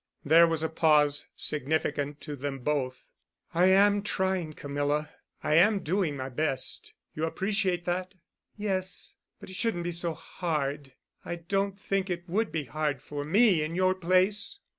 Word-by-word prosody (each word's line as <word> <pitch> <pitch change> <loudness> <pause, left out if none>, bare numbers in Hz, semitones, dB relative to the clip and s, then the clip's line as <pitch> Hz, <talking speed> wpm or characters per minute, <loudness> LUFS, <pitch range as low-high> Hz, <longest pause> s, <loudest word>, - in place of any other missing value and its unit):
There 165 +3 +7
was 165 -1 +1
a 160 - 0
pause—significant 150 -1 +1
to 150 - -6
them 140 0 -4
both. 130 -2 -2 0.5
"I 175 +2 +4
am 200 +2 +5
trying, 190 -5 -1
Camilla. 145 +1 -2 0.3
I - - +1
am 195 +5 +5
doing 165 -3 0
my 130 0 -4
best. 135 0 -2 0.2
You 155 - -1
appreciate 190 0 -1
that?" 185 +2 -2 0.4
"Yes, 190 -3 -2 0.3
but 200 -2 -10
it - - -5
shouldn't 200 -5 0
be 175 - -2
so 170 -1 -1
hard. 145 -6 -3 0.3
I 175 - -4
don't 195 +3 -2
think 195 -1 -1
it 175 0 -4
would 210 +5 0
be 160 -2 -2
hard 145 +1 -2
for 145 +1 -6
me 195 +2 +4
in 155 +2 -3
your 185 0 +3
place!" 185 - +2
170 Hz, 155 wpm, -28 LUFS, 150-190 Hz, 0.5 s, There